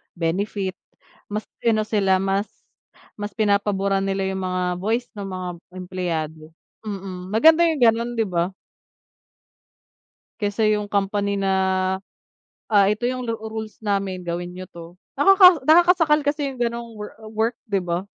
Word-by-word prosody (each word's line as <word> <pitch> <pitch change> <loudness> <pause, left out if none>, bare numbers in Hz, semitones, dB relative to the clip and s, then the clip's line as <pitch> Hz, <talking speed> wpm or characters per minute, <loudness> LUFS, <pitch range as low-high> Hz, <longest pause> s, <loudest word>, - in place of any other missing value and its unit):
benefit, 190 +3 -2 0.6
mas 210 +1 -3 0.2
sino 220 -2 +2
sila, 200 -3 +2
mas 195 +2 0 0.7
mas 205 0 -5
pinapaburan 200 -2 +1
nila 195 0 -1
yung 190 0 -3
mga 185 0 -1 0.2
voice 230 +5 0
ng 200 -1 -5
mga 185 -1 -5 0.3
empleyado. 170 -4 -4 0.4
Mm, 190 -3 -6
maganda 320 +9 +6
yung 315 -5 -1
ganon, 230 +1 +3
'di 225 -1 +1
ba? 175 -1 0 1.9
Kaysa 210 0 +1
yung 210 -1 +1
company 200 0 0
na, 195 -1 0 1.2
ah, 200 -2 +5
"ito 210 +3 0
yung 250 0 -1
lu 230 - -1
rules 220 0 -7
namin 195 -3 -1
gawin 175 +1 -4
niyo 185 0 -9
'to." 170 0 -11 0.2
Nakaka 385 +5 +7 0.2
nakakasakal 325 -2 +5
kasi 285 -1 -1
yung - - -14
ganong 235 -1 -3
wo 210 -1 -7 0.2
work 225 +2 0
'di 200 -4 0
ba? 175 +2 -3
205 Hz, 140 wpm, -22 LUFS, 185-230 Hz, 1.9 s, Nakaka